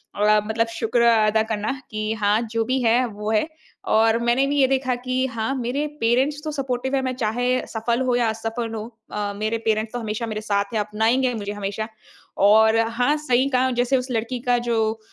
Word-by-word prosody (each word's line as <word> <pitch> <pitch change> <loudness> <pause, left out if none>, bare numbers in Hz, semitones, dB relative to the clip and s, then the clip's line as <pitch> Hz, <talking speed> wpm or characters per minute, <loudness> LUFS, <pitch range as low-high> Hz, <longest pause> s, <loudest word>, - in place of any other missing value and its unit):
अ, 210 +1 +4
मतलब 230 +1 0
शुक्र 230 +1 -1
अदा 220 -1 +4
करना 220 -1 -2 0.2
कि 215 0 -2
हाँ, 210 0 +1
जो 230 0 -2
भी 255 +2 0
है 240 +2 +3
वो 210 0 -5
है। 215 +7 +2 0.4
और 225 +1 +4
मैंने 240 +3 +2
भी 290 +1 -1
ये 265 - +5
देखा 260 -1 0
कि 255 +1 -1
हाँ, 230 0 -2
मेरे 260 +3 -2 0.2
पेरेंट्स 260 +6 +1
तो 310 - -3
सपोर्टिव़ 265 -2 -2
हैं 270 - +1
मैं 260 -1 -2
चाहे 245 +2 0
सफल 235 +2 -1
हो 250 -1 +2
या 240 -1 +2
असफल 225 +1 -4
हो। 215 -1 -4 0.3
अ, 205 -1 -3
मेरे 215 +2 -1
पेरेंट्स 220 +1 0
तो 245 - -2
हमेशा 220 0 -3
मेरे 215 -1 -4
साथ 200 0 -1
हैं 220 - +1
अपनाएँगे 225 +5 +1
मुझे 205 -3 -4
हमेशा। 205 +1 -4 0.6
और 220 +2 +6
हाँ, 230 +5 +1
सही 270 -3 +1
कहा 260 -1 +2
जैसे 245 +2 +1
उस 250 0 -3
लड़की 230 +2 -2
का 245 - +4
जो 220 -1 0
230 Hz, 200 wpm, -23 LUFS, 220-250 Hz, 0.6 s, और